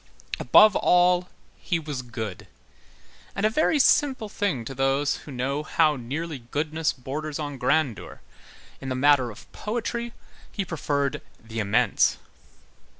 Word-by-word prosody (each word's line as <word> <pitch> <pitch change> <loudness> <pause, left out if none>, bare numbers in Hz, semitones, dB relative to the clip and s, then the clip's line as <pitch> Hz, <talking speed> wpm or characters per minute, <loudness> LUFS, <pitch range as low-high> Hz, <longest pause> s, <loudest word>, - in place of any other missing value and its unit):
Above 215 -1 +6
all, 180 0 +3 0.3
he 175 - -1
was 150 -5 -5
good; 110 -6 -6 0.9
and, 200 - 0
a 215 - +3
very 310 +4 +2
simple 265 -4 +3
thing 195 - -2
to 135 - -6
those 135 +2 +1
who 150 - -11
know 135 +3 -2
how 155 0 +2
nearly 145 +5 -5
goodness 150 +6 -2
borders 145 +3 -5
on 145 -3 -5
grandeur, 140 - 0 0.6
in 135 - -5
the 130 - -1
matter 135 -2 +4
of 115 - -12
poetry, 235 +2 -3 0.4
he 200 - -3
preferred 145 -4 -2 0.2
the 110 0 -7
immense. 100 -2 +2
145 Hz, 135 wpm, -25 LUFS, 130-180 Hz, 0.9 s, Above